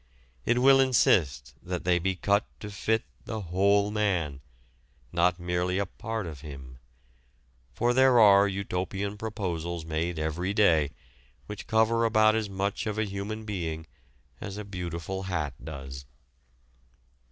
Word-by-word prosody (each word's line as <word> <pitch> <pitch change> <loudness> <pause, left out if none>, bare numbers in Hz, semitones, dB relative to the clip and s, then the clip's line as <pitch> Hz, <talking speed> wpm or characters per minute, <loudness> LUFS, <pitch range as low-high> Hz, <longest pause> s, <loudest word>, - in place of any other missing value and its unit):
It 120 - +3
will 135 +2 +6
insist 75 - +3
that 90 -1 -4
they 90 0 +3
be 95 +2 -1
cut 100 +3 +1
to 105 - -7
fit 110 +3 0 0.2
the 110 - -4
whole 100 +3 +2
man, 90 -10 -1 0.7
not 90 +1 +2
merely 90 +1 -1
a 100 - +1
part 110 +2 -5
of 75 -5 -8
him. 70 -4 -10 0.9
For 120 +1 +1
there 130 -1 +5
are 100 -2 +7
utopian 100 +1 -3
proposals 85 -6 -4
made 80 +2 -2
every 85 +5 -2
day 80 -9 +4 0.6
which 105 +5 -8
cover 110 +1 +3
about 110 -1 +4
as 110 -2 -1
much 100 +3 -2
of 105 0 -3
a 110 - +1
human 105 +2 -5
being 80 -6 -4 0.5
as 100 0 -6
a 105 - -6
beautiful 90 -1 -5
hat 75 -6 -2
does. 70 -3 -8
95 Hz, 140 wpm, -28 LUFS, 85-105 Hz, 0.9 s, are